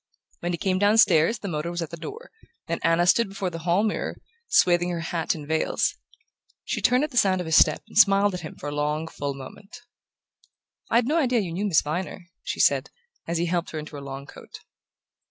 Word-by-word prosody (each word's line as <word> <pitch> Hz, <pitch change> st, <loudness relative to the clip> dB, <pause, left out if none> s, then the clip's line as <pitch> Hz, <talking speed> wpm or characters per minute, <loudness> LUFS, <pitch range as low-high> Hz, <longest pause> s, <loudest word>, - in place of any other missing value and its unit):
When 175 Hz, -, -3 dB
he 170 Hz, -, -2 dB
came 185 Hz, +2 st, 0 dB
downstairs 205 Hz, -2 st, +4 dB
the 200 Hz, -, -7 dB
motor 155 Hz, -1 st, -3 dB
was 175 Hz, 0 st, -3 dB
at 165 Hz, -, -8 dB
the -, -, -5 dB
door, 450 Hz, -, -9 dB, 0.4 s
and -, -, -3 dB
Anna 165 Hz, +1 st, +3 dB
stood 215 Hz, +4 st, +3 dB
before 195 Hz, -2 st, -4 dB
the 165 Hz, -, -6 dB
hall 175 Hz, +5 st, +1 dB
mirror, 215 Hz, -, -2 dB, 0.3 s
swathing 175 Hz, 0 st, +3 dB
her 170 Hz, -1 st, -3 dB
hat 165 Hz, 0 st, -2 dB
in 150 Hz, -2 st, -8 dB
veils. 160 Hz, +1 st, 0 dB, 0.7 s
She -, -, -3 dB
turned 250 Hz, +3 st, +3 dB
at 300 Hz, -, -3 dB
the 245 Hz, -, -5 dB
sound 190 Hz, -4 st, +3 dB
of 180 Hz, -, -3 dB
his 160 Hz, 0 st, +1 dB
step -, -, +4 dB
and -, -, -17 dB
smiled 200 Hz, -1 st, +5 dB
at 180 Hz, -, -4 dB
him 155 Hz, -, -8 dB
for 145 Hz, -, -8 dB
a -, -, -5 dB
long 150 Hz, +2 st, -1 dB
full 140 Hz, -3 st, -4 dB
moment. 195 Hz, -, -11 dB, 1.1 s
"I'd 235 Hz, +1 st, +3 dB
no 310 Hz, +6 st, +1 dB
idea 250 Hz, -6 st, +2 dB
you 180 Hz, -4 st, -4 dB
knew 200 Hz, +4 st, -1 dB
Miss 170 Hz, -6 st, +3 dB
Viner," 175 Hz, +4 st, -4 dB, 0.2 s
she -, -, -5 dB
said, -, -, +3 dB, 0.4 s
as 170 Hz, -, -1 dB
he 170 Hz, -, 0 dB
helped 175 Hz, 0 st, -1 dB
her 160 Hz, -, -6 dB
into 155 Hz, 0 st, -7 dB
her 140 Hz, -, -7 dB
long 135 Hz, 0 st, -7 dB
coat. -, -, -13 dB
175 Hz, 220 wpm, -25 LUFS, 160-200 Hz, 1.1 s, smiled